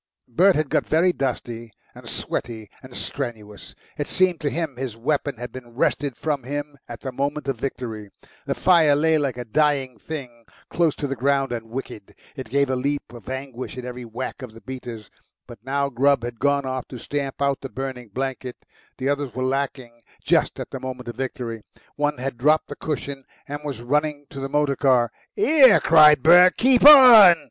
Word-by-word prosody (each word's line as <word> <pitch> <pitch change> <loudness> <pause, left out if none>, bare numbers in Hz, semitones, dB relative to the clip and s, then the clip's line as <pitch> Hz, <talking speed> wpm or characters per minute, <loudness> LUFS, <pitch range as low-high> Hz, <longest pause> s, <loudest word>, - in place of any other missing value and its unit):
Bert 180 +10 +3
had 155 -2 -1
got - - 0
very 175 +3 +3
dusty 120 -4 -4 0.2
and - - -11
sweaty 110 -3 -4
and 130 -2 -11
strenuous. 110 -6 -6 0.2
It 145 - -2
seemed 185 -2 +1
to 145 - 0
him 160 -3 -4
his 125 -3 -6
weapon 140 +2 -2
had 120 +2 -7
been 120 -2 -11
wrested 140 0 -1
from 150 -3 -2
him 145 +3 -5
at 120 -2 -9
the 130 - -5
moment 140 +3 -3
of 135 -4 -2
victory. 115 -6 -5 0.4
The - - -1
fire 165 -6 +4
lay 160 +1 +2
like 140 -4 -2
a 125 - -6
dying 135 -1 0
thing, 125 -5 -8 0.3
close 165 -3 +1
to - - -4
the 135 -1 -3
ground 135 +1 0
and 115 -2 -5
wicked; 115 -4 -8 0.2
it 130 -6 -8
gave 140 +1 +1
a - - 0
leap 140 +1 -3
of 120 -3 -11
anguish 130 -1 -6
at 125 - -6
every 125 0 -7
whack 120 +5 -6
of 125 -4 -9
the 115 - -14
beaters. 120 -5 -9 0.3
But 120 - -13
now 140 +2 -1
Grubb 140 0 +2
had 120 -1 -6
gone 140 0 +1
off 130 -1 -4
to 125 - -9
stamp 135 +2 -4
out 140 -1 0
the 135 - -7
burning 130 -2 -6
blanket; 130 +2 -5 0.4
the 130 - -3
others 140 -3 -2
were 130 - -2
lacking 130 -3 -3 0.2
just - - +1
at - - -7
the - - -5
moment 125 -2 -7
of 120 - -7
victory. 120 -4 -5 0.3
One 145 -1 -1
had 125 -1 -5
dropped 155 +4 +2
the - - -6
cushion 140 -3 -5 0.2
and 145 +1 -5
was 140 -5 -6
running 145 +2 -1
to 140 - -8
the 135 0 -4
motor 145 -1 +1
car. 125 -4 +2 0.3
"'ERE!" 295 - +6
cried 150 -4 +6
Bert; 180 +3 +7
"keep 255 0 +3
on!" 240 - +10
135 Hz, 195 wpm, -22 LUFS, 125-145 Hz, 0.4 s, on